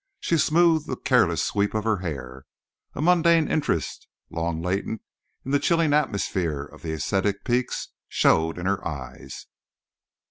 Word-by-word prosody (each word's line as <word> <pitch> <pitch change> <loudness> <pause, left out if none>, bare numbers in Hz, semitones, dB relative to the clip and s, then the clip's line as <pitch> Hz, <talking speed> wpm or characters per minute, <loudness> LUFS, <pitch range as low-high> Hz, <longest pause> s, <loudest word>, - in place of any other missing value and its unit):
She 165 - +1
smoothed 160 0 +3
the - - -2
careless 105 - +2
sweep 105 +1 0
of 110 - 0
her 110 -1 +1
hair. 65 -7 -6 0.5
A 145 - -2
mundane 170 -2 +4
interest, 140 - -1 0.2
long 80 0 -2
latent 95 +5 -2 0.4
in 135 - -4
the 145 - +3
chilling 165 -2 +2
atmosphere 95 - 0
of 70 - -14
the 80 +1 -4
ascetic 95 +6 -1
peaks, 125 0 -1 0.2
showed 80 +1 +2
in 90 - -5
her 100 0 0
eyes. 70 -3 -8
100 Hz, 145 wpm, -25 LUFS, -, 0.5 s, mundane